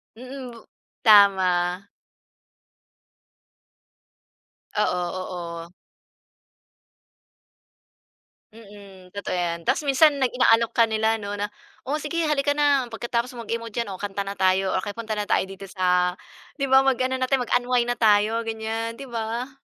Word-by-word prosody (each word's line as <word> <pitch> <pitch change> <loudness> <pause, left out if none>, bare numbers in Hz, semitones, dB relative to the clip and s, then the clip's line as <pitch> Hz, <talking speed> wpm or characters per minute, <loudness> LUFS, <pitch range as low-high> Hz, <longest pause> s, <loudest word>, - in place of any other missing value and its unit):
Mm 255 +1 -9
bu 230 - -15 0.4
tama. 190 -4 +4 2.9
Oo, 180 -4 0 0.3
oo. 170 -1 -7 2.9
Mm 200 -4 -14
totoo 200 0 -4
yan. 175 -2 -1
Ta's - - +1
minsan 285 +2 +4
nag 260 - +3
inaalok 230 -2 +3
ka 230 - +5
nila 220 0 +1
'no 205 -1 -6
na, 205 0 -3 0.4
"O, 285 +4 -1
sige 335 +3 -2
halika 285 -1 +1
na 285 -3 +2
pagkatapos 235 +2 -2
mo 240 - -7
mag-emote 230 0 -4
diyan, 230 - -5
o - - -7
kanta 200 -1 -3
na 200 +1 -6
tayo, 190 0 +2
o 185 - 0
kaya 205 - -5
punta 220 -2 -4
na 210 - -2
tayo - - +3
dito 195 0 -9
sa" 180 -1 +1 0.4
'Di 275 - -1
ba 265 0 +5
mag-ano 260 0 +1
na 260 - 0
tayo. 270 -2 +2
Mag-unwind 245 0 +1
na 245 - -1
tayo, 215 +1 +3
ganyan. 225 +1 -3
'Di 275 - -8
ba? 230 +2 -4
225 Hz, 140 wpm, -24 LUFS, 200-250 Hz, 2.9 s, ka